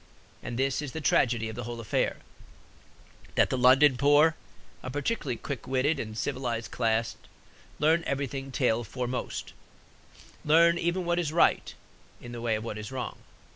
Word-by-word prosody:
And 120 - -5
this 135 +2 0
is 145 -4 -6
the 160 - -4
tragedy 120 -6 +2
of 110 - -6
the 120 -1 -5
whole 120 0 -6
affair: 115 - -1 1.2
that - - +3
the - - +1
London 130 +2 +6
poor, 145 +3 +5 0.5
a 130 - -6
particularly 145 - -2
quick 130 0 -6
witted 135 +4 +1
and 110 -2 -5
civilized 120 +1 -3
class, 115 -1 0 0.6
learn 160 +3 +3
everything 135 -1 -3
tail 120 -3 +1
foremost, 125 +5 -4 0.9
learn 170 +3 +5
even 175 +1 -1
what 175 0 +1
is 160 -4 -1
right 165 - +2 0.4
in 120 - -10
the 120 -1 -7
way 115 -2 +1
of 110 - -4
what 110 -2 -5
is 105 +3 -7
wrong. 130 -1 -5
130 Hz, 160 wpm, -28 LUFS, 120-150 Hz, 1.2 s, London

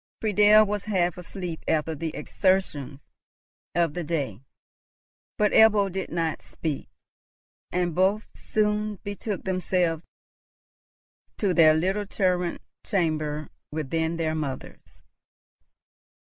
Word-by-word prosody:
Friedel 210 0 +6
was 205 -1 -3
half 180 -5 +1
asleep 180 -2 -6
after 160 0 +1
the 160 +2 -3
exertions 150 -8 0 0.7
of 170 -3 +2
the 175 - -3
day; 140 - -2 1.0
but 210 -1 +3
Ebbo 210 -3 +5
did 190 +1 -4
not 165 -1 -2
speak, 155 -4 -5 0.8
and 175 -1 0
both 195 +5 +2
soon 210 0 0
betook 205 0 -4
themselves 180 -3 0 1.4
to 200 -4 +1
their 155 -3 +6
little 190 +5 0
turret 180 -3 0 0.2
chamber 155 -6 -1 0.2
within 160 +2 -1
their 160 -1 0
mother's. 145 -5 -6
175 Hz, 105 wpm, -26 LUFS, 160-200 Hz, 1.4 s, Friedel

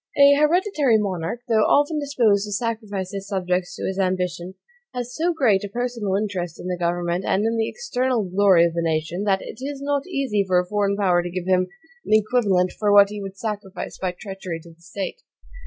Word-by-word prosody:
An 280 0 +7
hereditary 300 - +3
monarch, 195 +1 -3
though 225 -2 +3
often 290 +7 +3
disposed 235 -8 +2
to - - -7
sacrifice 205 -4 -3
his 195 0 -5
subjects 180 -2 -1
to - - -5
his 190 +1 -3
ambition, 185 -1 -1 0.4
has 245 0 -4
so 340 +2 +1
great 240 - +2
a 205 - -5
personal 235 -3 -2
interest 185 -5 -3
in - - -8
the 180 - -1
government 175 +1 -1
and 200 +2 +1
in 225 +1 +1
the 225 -1 0
external 255 - -1
glory 185 -2 +4
of 170 - -1
the 170 - -1
nation, 165 +4 -1
that 195 -2 +1
it - - -9
is 280 +1 -5
not 285 +2 -1
easy 270 - 0
for 185 -2 +1
a 180 - -1
foreign 200 +1 0
power 180 -4 +3
to 175 - -5
give 180 0 -4
him 185 -1 +2 0.4
an - - -1
equivalent 205 -5 +2
for 210 -1 +2
what 200 -1 +7
he 210 0 -6
would 195 0 -7
sacrifice 205 -2 -5
by 185 -1 -1
treachery 185 -2 -7
to 170 - -14
the 165 - -27
state. 195 - -6
200 Hz, 205 wpm, -23 LUFS, 180-240 Hz, 0.4 s, An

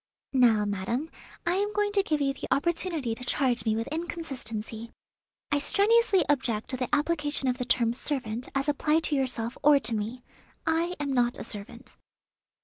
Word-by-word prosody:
"Now, 230 -5 +4
madam, 205 +10 -2 0.3
I 345 +2 +1
am 410 +1 -1
going 415 0 +1
to 405 -1 +3
give 310 -6 -1
you 275 -1 +1
the - - -7
opportunity 330 -5 0
to 250 - -9
charge 245 -3 +1
me 220 -1 +2
with 225 +1 -2
inconsistency. 245 -9 -4 0.6
I 290 - +3
strenuously 405 +5 +4
object 255 -6 0
to 255 - -2
the 250 -1 -2
application 295 -2 0
of 250 +1 0
the 250 - -2
term 235 -2 +2
'servant' 245 -3 -2
as 275 +1 0
applied 300 +2 +2
to 300 - 0
yourself 250 -3 -2
or 295 -1 +6
to 230 +1 0
me. 225 +4 -3 0.4
I 330 +2 +1
am 285 -2 -1
not 245 -1 +1
a - - -6
servant." 230 +4 -5
270 Hz, 175 wpm, -28 LUFS, 235-320 Hz, 0.6 s, or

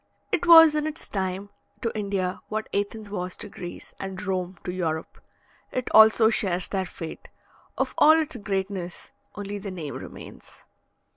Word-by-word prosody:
It 350 - 0
was 325 -2 +10
in 305 0 0
its 310 +1 -6
time 190 0 -3 0.3
to 230 - -2
India 195 -3 -2
what 215 0 -3
Athens 205 +1 -2
was 180 -2 -4
to 210 - -6
Greece, 175 -2 -9
and 190 -1 -5
Rome 185 -2 -3
to 180 - -3
Europe. 160 -3 -3 0.5
It 255 -1 -2
also 220 +1 +7
shares 185 -5 0
their 190 -2 -2
fate 165 -2 -8 0.5
of - - -1
all 310 - +8
its 315 -3 -2
greatness 190 -3 -4 0.2
only 205 0 -5
the 200 0 -6
name 165 -6 -6
remains. - - -10
200 Hz, 155 wpm, -26 LUFS, 185-220 Hz, 0.5 s, was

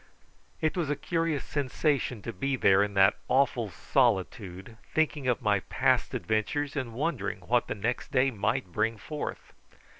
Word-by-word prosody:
It 155 - +1
was 170 -5 -1
a 145 - +1
curious 165 -4 -1
sensation 140 - -1
to - - -5
be 135 +8 -1
there 100 -5 +5
in 100 -1 -1
that 95 +1 +5
awful 130 -5 +2
solitude, 100 -4 0 0.2
thinking 155 -3 +1
of 125 - +1
my 105 -2 +3
past - - +1
adventures, 135 +7 -1
and 130 -5 -3
wondering 145 +2 -2
what 120 0 +1
the - - -3
next 115 +4 -2
day 130 +1 +3
might 100 -4 -1
bring 115 +6 0
forth. 150 +7 -6
125 Hz, 155 wpm, -29 LUFS, 105-145 Hz, 0.2 s, there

